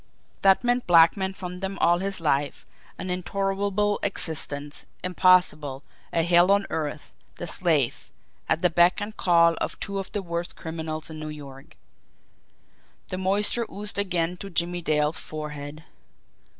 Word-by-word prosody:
That 195 +4 +4
meant 245 0 0
blackmail 175 +3 +5
from 180 -1 -7
them 195 +1 -4
all 175 +1 +3
his 195 0 -1
life, 145 -3 -1 0.3
an 185 - -4
intolerable 200 +2 -1
existence, 150 -6 -2 0.2
impossible, 180 -6 +3 0.3
a 165 - +1
hell 175 +2 +5
on 200 0 +3
earth 150 -1 -4 0.2
the - - -6
slave, 160 -8 0 0.4
at 160 +3 +1
the 180 - +4
beck 175 +3 +4
and 210 +1 -5
call 170 -2 +4
of - - -3
two 200 -1 -4
of 195 - -6
the 205 - -3
worst 170 0 -4
criminals 160 -1 -6
in 155 - -8
New 155 0 -5
York! 140 -3 -11 1.3
The 185 - -4
moisture 205 +5 +1
oozed 205 0 -4
again 180 -3 0
to 200 - -8
Jimmie 175 0 -1
Dale's 150 -1 +1
forehead. 150 0 -7
175 Hz, 145 wpm, -25 LUFS, 155-195 Hz, 1.3 s, blackmail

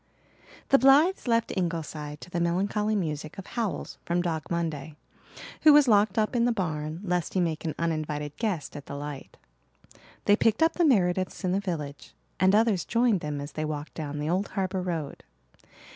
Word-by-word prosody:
The 275 - +6
Blythes 280 +7 +5
left 230 -1 +1
Ingleside 160 -4 -3
to 180 - -11
the 175 - -1
melancholy 200 +5 0
music 155 -3 -3
of 195 - -7
howls 225 -5 -4
from 175 +1 0
Dog 160 -4 -3
Monday, 160 -3 -3 0.7
who 305 - +8
was 290 -2 +6
locked 215 0 +4
up 215 +3 +1
in 235 -1 +3
the 245 - +3
barn 160 -5 -3
lest 180 -2 -1
he - - +3
make 165 -3 -1
an 160 - -2
uninvited 155 -3 -2
guest 190 - -2
at 145 -1 -8
the 140 - -6
light. 145 -1 -7 0.9
They 205 - +6
picked 225 +6 +2
up 325 - +3
the 345 - +2
Merediths 185 - +1
in 180 - +1
the 190 - +1
village, 155 -7 -5 0.2
and 190 +2 +4
others 215 -4 +3
joined 235 -4 +2
them 150 -2 -4
as 145 +1 -6
they 155 - -4
walked 150 -1 -5
down 150 -2 -5
the 150 +1 -3
old 185 +4 0
harbour 190 -1 -2
road. 165 -6 -4
175 Hz, 185 wpm, -27 LUFS, 155-210 Hz, 0.9 s, who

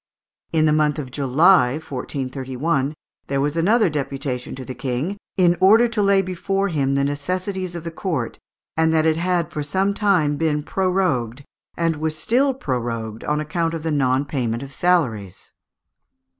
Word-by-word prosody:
In 155 -1 +3
the 155 - +3
month 150 -1 +2
of 135 -4 -5
July, 140 0 +4
1431, 135 0 -3 0.3
there 140 0 -1
was 145 +2 0
another 210 +7 +3
deputation 135 -4 -3
to 130 -1 -8
the 130 - -6
King, 130 +9 -3 0.2
"in 175 -2 +4
order 220 +6 +6
to 225 -2 -1
lay 200 -1 +4
before 195 +2 -1
him 140 -5 0
the 140 - +2
necessities 180 +6 -2
of 170 - -5
the 170 - -5
court, 160 - -3 0.4
and 160 0 +3
that 160 0 +3
it 160 -1 +3
had 175 0 0
for 150 - -2
some 190 +7 0
time 180 -9 +2
been 150 -2 0
prorogued, 180 - 0 0.3
and 165 -2 0
was 155 0 -2
still 260 - +2
prorogued, 115 - -3
on 150 0 0
account 165 +2 -1
of 160 - -6
the 160 - -1
non 135 -1 +1
payment 125 -4 -2
of 135 0 -9
salaries." 125 - 0
155 Hz, 165 wpm, -22 LUFS, 135-180 Hz, 0.4 s, order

